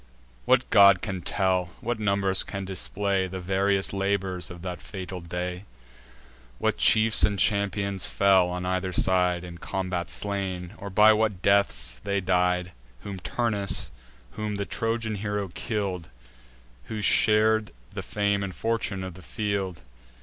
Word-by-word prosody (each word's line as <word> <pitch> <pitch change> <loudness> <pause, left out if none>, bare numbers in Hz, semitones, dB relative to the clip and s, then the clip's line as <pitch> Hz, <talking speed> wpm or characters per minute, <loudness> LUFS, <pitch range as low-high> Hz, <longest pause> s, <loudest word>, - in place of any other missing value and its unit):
What - - +3
god 100 -2 +7
can 95 -3 -3
tell, 95 0 +1
what 120 -1 -3
numbers 100 -2 +2
can 100 -1 -5
display, 95 0 -1
The 95 +1 -6
various 95 +2 +1
labours 95 -3 -1
of 85 0 -10
that 90 -1 -5
fatal 95 -2 -7
day; 90 +2 -5 0.9
What - - 0
chiefs 110 0 +4
and 100 -1 +2
champions 100 -1 0
fell 95 -2 +4
on 90 0 -4
either 95 0 -1
side, 90 -1 +2
In 85 -1 -9
combat 95 -2 -3
slain, 95 -1 -3
or 100 - -6
by 105 +3 +6
what 105 -4 0
deaths 100 0 +2
they 100 0 0
died; 90 -1 +1 0.3
Whom 100 -2 -7
Turnus, 105 0 -1 0.4
whom 105 -1 -4
the 100 0 -3
Trojan 115 -1 -2
hero 105 -1 -3
kill'd; 95 -4 -4 0.8
Who 105 +5 -5
shar'd 110 0 +4 0.2
the - - -4
fame 100 -1 0
and 95 -3 -5
fortune 110 -1 -2
of 95 -1 -6
the 95 - -13
field! 95 - -3
95 Hz, 140 wpm, -26 LUFS, 90-105 Hz, 0.9 s, god